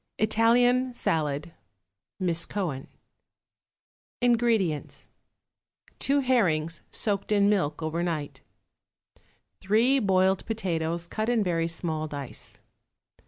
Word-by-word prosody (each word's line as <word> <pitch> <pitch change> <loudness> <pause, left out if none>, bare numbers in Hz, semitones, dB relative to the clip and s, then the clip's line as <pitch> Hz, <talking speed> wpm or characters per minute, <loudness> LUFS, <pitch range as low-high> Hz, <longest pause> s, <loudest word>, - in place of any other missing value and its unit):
=Italian 245 +3 +3
Salad.= 155 -4 -1 0.7
(MISS 170 -3 0
COHEN.) 160 -10 -3 1.3
INGREDIENTS. 230 -10 0 0.9
2 280 +1 +2
herrings, 170 - +1
soaked 205 -1 -1
in 200 -1 +4
milk 180 -7 0
over 160 +2 -2
night. 160 -4 -3 1.2
3 230 +8 +3
boiled 190 -3 +2
potatoes, 170 -6 -2
cut 215 +6 -3
in 235 -3 +2
very 165 -3 0
small 160 -2 -2
dice. 145 -3 -8
185 Hz, 90 wpm, -27 LUFS, 160-225 Hz, 1.3 s, in